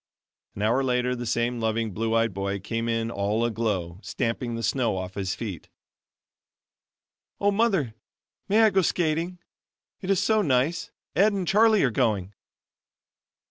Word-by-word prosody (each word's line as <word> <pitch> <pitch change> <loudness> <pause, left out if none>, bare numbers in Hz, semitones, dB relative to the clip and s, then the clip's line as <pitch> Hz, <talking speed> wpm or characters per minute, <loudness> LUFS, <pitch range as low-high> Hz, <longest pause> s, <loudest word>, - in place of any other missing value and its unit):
An 100 - -3
hour 120 +5 +2
later, 125 -1 +1
the 120 -1 -5
same 120 +1 0
loving, 110 0 -1
blue 115 +3 -1
eyed 115 -2 +2
boy 100 +1 -2
came 115 +4 -3
in 115 0 -1
all 105 +2 0
aglow, 105 -7 -2
stamping 115 +1 -2
the 115 - -4
snow 120 -7 +1
off 95 0 -5
his 95 -1 -2
feet. 100 -9 -6 1.7
"Oh, 205 0 +3
Mother, 195 - +1 0.6
may 215 +3 +5
I 220 - +5
go 190 - +3
skating? 170 +1 0 0.6
it 190 - -6
is 195 -2 +3
so 220 -1 +3
nice 150 +1 +1 0.3
Ed 205 +6 +4
and 190 -3 -2
Charlie 215 +2 +5
are 130 - +2
going." 105 -5 0
120 Hz, 150 wpm, -26 LUFS, 110-170 Hz, 1.7 s, may